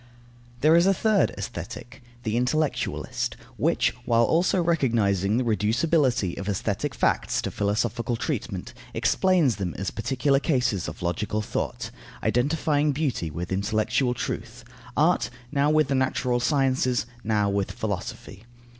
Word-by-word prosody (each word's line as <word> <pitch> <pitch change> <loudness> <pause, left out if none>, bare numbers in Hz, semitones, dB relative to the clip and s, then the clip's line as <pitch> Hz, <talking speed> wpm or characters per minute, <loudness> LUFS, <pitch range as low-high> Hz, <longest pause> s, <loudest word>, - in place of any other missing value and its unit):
There 155 +3 +6
is 170 +2 +5
a 195 - +4
third 215 -1 +3
Aesthetic, 130 +3 -7 0.2
the 110 -1 -1
intellectualist, 140 +5 -1 0.2
which, - - +2
while 115 -1 +3
also 170 +8 +2
recognizing 115 - +2
the 130 - +1
reducibility 120 - +1
of 100 +1 -4
aesthetic 100 - -2
facts - - +1
to - - -2
philosophical 110 +3 -1
treatment, 115 - -4 0.2
explains 175 - +3
them 90 -4 -3
as 95 0 -3
particular 135 +5 +1
cases 125 - 0
of 80 +4 -7
logical 105 +5 -1
thought, - - -3 0.3
identifying 145 +3 +1
beauty 135 - -1
with 85 +4 -5
intellectual 110 +6 +1
truth; 120 +1 -5 0.3
art, 165 +4 +3 0.2
now 145 0 +2
with 155 -2 +3
the 140 - 0
natural 130 -2 +1
sciences, 130 -2 +1 0.2
now 105 -2 +1
with 100 -1 0
philosophy. 100 0 -5
120 Hz, 130 wpm, -25 LUFS, 105-145 Hz, 0.3 s, There